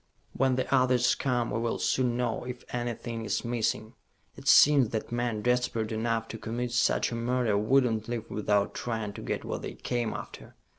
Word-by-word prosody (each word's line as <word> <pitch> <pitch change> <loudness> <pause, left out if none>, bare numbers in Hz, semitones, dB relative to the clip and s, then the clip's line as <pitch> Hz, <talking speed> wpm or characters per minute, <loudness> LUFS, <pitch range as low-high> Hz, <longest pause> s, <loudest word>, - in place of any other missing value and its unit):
"When 130 -1 +2
the 130 +1 -1
others 125 -2 +4
come, 120 -3 -1
we 115 - -1
will 115 0 -1
soon 125 -2 +1
know 120 -3 -1
if 125 0 -7
anything 120 -1 -3
is 110 - -2
missing. 110 -2 -1 0.4
It - - -11
seems 140 -5 +7
that 110 0 -4
men 120 -3 -1
desperate 125 -3 0
enough 115 0 -1
to 115 - -6
commit 120 +2 -3
such 120 - +2
a - - -3
murder 120 -2 0
would 125 +7 +4
not 110 -3 -1
leave 115 -1 -4
without 105 -1 0
trying 110 -3 -3
to - - -8
get - - -3
what - - -4
they - - -6
came 120 -3 -2
after. - - -9
120 Hz, 190 wpm, -28 LUFS, 110-125 Hz, 0.4 s, seems